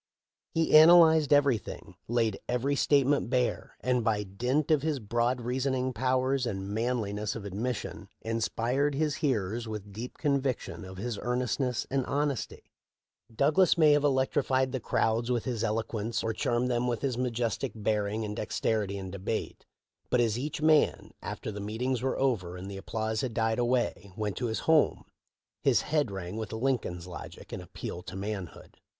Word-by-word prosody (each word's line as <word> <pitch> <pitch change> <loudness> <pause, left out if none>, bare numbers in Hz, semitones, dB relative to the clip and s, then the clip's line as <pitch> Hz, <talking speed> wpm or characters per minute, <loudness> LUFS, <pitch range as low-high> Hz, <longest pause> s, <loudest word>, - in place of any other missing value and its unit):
He 160 -1 +3
analyzed 160 -2 +8
everything, 140 -6 +1
laid 115 -3 +1
every 125 +4 +1
state 140 -1 +3
ment 140 -3 +1
bare, 125 -1 -1
and 125 -1 +1
by 105 -2 +1
dint 125 +11 -1
of 150 -3 +4
his 155 -1 0
broad 120 +2 0
reasoning 130 +1 -1
pow 130 +3 +1
ers 130 -1 0
and 95 -3 -4
manliness 110 -3 -1
of 110 -3 -6
admission 110 +5 -4
inspired 120 +5 0
his 150 0 0
hearers 115 - -1
with 105 -2 -6
deep 115 +5 -7
conviction 140 -9 -1
of 95 0 -9
his 110 +1 -4
earnestness 125 0 -1
and 135 -1 +1
hon 145 +1 +1
esty. 130 - -6 0.7
Douglas 150 +10 +3
may 155 -2 +6
have 145 0 +4
electrified 130 -1 +2
the 130 - -2
crowds 115 +1 0
with 120 -3 0
his 120 -4 -2
eloquence 110 0 -1
or 115 - -1
charmed 120 +3 0
them 120 0 +1
with 120 +1 -2
his 135 -3 0
majestic 120 0 -1
bearing 105 0 -1
and 105 0 -4
dexterity 105 -2 -1
in 95 -1 -6
debate, 100 +3 -4 0.4
but 125 - +2
as 115 -3 +2
each 150 +4 -3
man, 155 -1 +3
after - - -5
the 105 - -6
meetings 120 +4 -2
were 130 +1 -1
over 100 -10 0
and 95 +2 -7
the 100 - -6
applause 110 +2 -2
had 120 -4 -3
died 110 0 +1
away, 120 -4 0
went 105 -2 -2
to 125 - -1
his 110 - -2
home, 160 -2 +3 0.6
his - - +3
head 150 -5 0
rang 95 0 -5
with 110 -2 -4
Lincoln's 110 -7 -1
logic 90 -1 -9
and - - -4
appeal 90 0 -7
to - - -9
manhood. 100 -2 -6
120 Hz, 170 wpm, -29 LUFS, 105-135 Hz, 0.7 s, analyzed